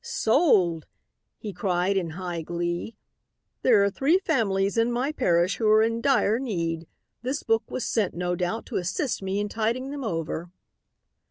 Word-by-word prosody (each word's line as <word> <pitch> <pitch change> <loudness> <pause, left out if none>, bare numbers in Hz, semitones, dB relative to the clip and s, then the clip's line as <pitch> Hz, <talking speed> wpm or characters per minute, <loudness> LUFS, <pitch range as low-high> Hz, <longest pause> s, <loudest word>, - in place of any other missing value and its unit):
"'Sold!' 220 - +2 0.5
he 210 -3 -7
cried 185 -1 0
in 180 -4 0
high 175 -3 -4
glee. 175 +5 -3 0.6
'There 220 -5 +5
are 200 - +3
three 285 - +3
families 200 - 0
in 230 +1 +2
my 250 +5 0
parish 180 - +1
who 220 - 0
are 215 +1 +6
in 230 +1 0
dire 245 -5 +2
need. 170 -9 -3 0.3
This 260 +4 -3
book 225 0 0
was 255 - -3
sent, 210 -5 0
no 180 0 -1
doubt, 180 +6 -2
to 240 - -4
assist 195 - -2
me 190 +1 -2
in 205 - -1
tiding 230 +5 -2
them 285 -1 -5
over.' 165 -3 -3
205 Hz, 165 wpm, -26 LUFS, 175-240 Hz, 0.6 s, are